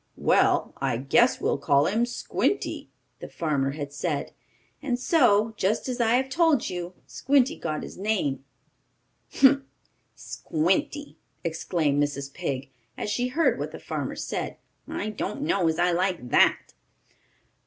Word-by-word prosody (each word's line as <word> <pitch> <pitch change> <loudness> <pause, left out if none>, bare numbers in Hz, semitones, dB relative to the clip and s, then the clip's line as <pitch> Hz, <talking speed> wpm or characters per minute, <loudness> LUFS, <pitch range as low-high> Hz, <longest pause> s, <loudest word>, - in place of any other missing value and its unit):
"Well, - - +2
I - - -1
guess 235 - +3
we'll - - 0
call 140 0 +3
him 225 +7 +1
Squinty," 245 +10 -2 0.3
the - - -7
farmer 140 -4 -1
had 145 -1 -6
said. 145 0 -2 0.5
And 260 -5 -1
so, 235 -6 +3
just 205 +7 0
as 250 -1 -2
I 230 0 +3
have 260 +1 +1
told 315 -2 +2
you, 180 0 -5
Squinty 275 +2 +2
got 155 -2 -4
his - - -9
name. 190 -11 -1 0.9
"Humph! 275 0 +5 0.5
Squinty!" 285 - -2 0.3
exclaimed 160 -3 0
Mrs. 140 -1 -2
Pig, 135 -6 -4 0.3
as 210 - -3
she 245 +4 0
heard 315 +6 +1
what - - -4
the - - -7
farmer - - -4
said. - - -4 0.3
"I 215 - -3
don't 215 +5 -4
know 195 - +1
as 160 0 0
I 175 +1 +3
like 175 -7 -1
that." - - +3
190 Hz, 145 wpm, -26 LUFS, 150-250 Hz, 0.9 s, Humph